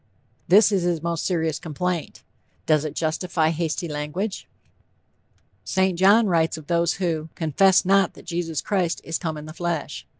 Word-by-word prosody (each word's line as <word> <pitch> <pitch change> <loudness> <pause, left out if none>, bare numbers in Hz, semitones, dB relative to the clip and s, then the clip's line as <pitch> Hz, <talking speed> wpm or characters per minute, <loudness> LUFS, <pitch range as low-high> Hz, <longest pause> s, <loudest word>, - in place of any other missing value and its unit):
This 205 +4 +6
is 195 -2 +1
his 170 -2 -1
most 170 -1 -2
serious 160 -4 -1
complaint. 170 +2 -4 0.4
Does 155 -1 +2
it 155 - -5
justify 160 0 0
hasty 165 +1 -2
language? 150 +7 -4 1.2
St. 190 -1 +1
John 200 +6 +5
writes 165 -4 +1
of 155 - -10
those 170 +1 +1
who 165 -4 -2
"confessed 180 +5 +3
not 195 -1 +3
that - - -14
Jesus 170 -3 -3
Christ 185 -5 -1
is 165 - -3
come 160 -3 -3
in 150 - -8
the 155 - -9
flesh." 170 -2 -4
170 Hz, 160 wpm, -23 LUFS, 160-185 Hz, 1.2 s, This